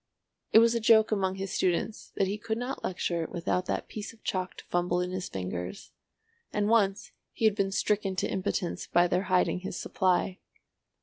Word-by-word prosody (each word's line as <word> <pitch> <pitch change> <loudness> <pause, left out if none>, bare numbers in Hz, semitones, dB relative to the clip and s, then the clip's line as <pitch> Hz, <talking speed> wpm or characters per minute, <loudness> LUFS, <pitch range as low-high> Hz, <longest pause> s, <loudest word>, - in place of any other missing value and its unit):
It - - +7
was 230 +1 +6
a 235 - +1
joke 220 -1 +5
among 190 -3 +1
his 195 0 -4
students 185 +4 -1
that 195 - +2
he 200 +2 -3
could 220 +1 -2
not 245 +3 -4
lecture 170 -2 -1
without 180 +1 -1
that - - -2
piece 215 +1 -7
of 225 - -23
chalk 185 -1 -2
to - - -9
fumble 175 0 0
in 180 0 -2
his 185 0 -4
fingers, 90 - -5 0.6
and 205 -1 0
once 205 -3 +2 0.2
he 225 - -1
had 215 - +5
been 200 -2 0
stricken 195 -1 0
to 185 - 0
impotence 185 -1 -2
by 175 +1 +4
their 180 +3 0
hiding 180 0 +2
his 180 -1 -5
supply. 185 0 +1
190 Hz, 190 wpm, -29 LUFS, 180-215 Hz, 0.6 s, It